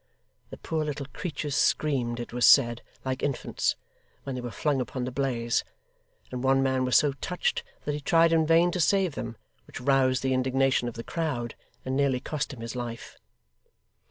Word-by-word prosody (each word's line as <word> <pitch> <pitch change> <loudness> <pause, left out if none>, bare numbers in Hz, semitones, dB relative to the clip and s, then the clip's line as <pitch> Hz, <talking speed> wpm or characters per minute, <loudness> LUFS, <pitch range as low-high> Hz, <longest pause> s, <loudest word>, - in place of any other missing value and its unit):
The - - -9
poor 160 -1 -2
little 145 -2 -4
creatures 150 -4 -4
screamed, 125 -6 +1
it 120 - -6
was 120 0 -1
said, 120 -4 +6 0.2
like 130 0 -2
infants, 140 -3 -1 0.5
when 135 - -4
they 125 - -4
were 120 - -5
flung 135 +4 0
upon 125 +1 -4
the 125 - -3
blaze; 125 -3 0 0.7
and 125 0 -4
one 135 0 +3
man 130 -1 +1
was 125 - +4
so 145 - +3
touched 180 -1 -1 0.2
that 145 - -1
he 150 - -4
tried 165 +2 +4
in 160 -1 +3
vain 165 +2 +5
to 180 - -3
save 185 0 +2
them, 115 -3 -6 0.3
which - - -8
roused 130 0 +2
the 130 0 +1
indignation 130 0 +2
of 120 - -5
the 115 - -6
crowd, 130 -9 -3 0.3
and 130 0 -1
nearly 135 -2 +2
cost 150 +3 -3
him 130 -4 -9
his 115 +1 -6
life. 120 -1 -6
135 Hz, 185 wpm, -27 LUFS, 125-150 Hz, 0.7 s, said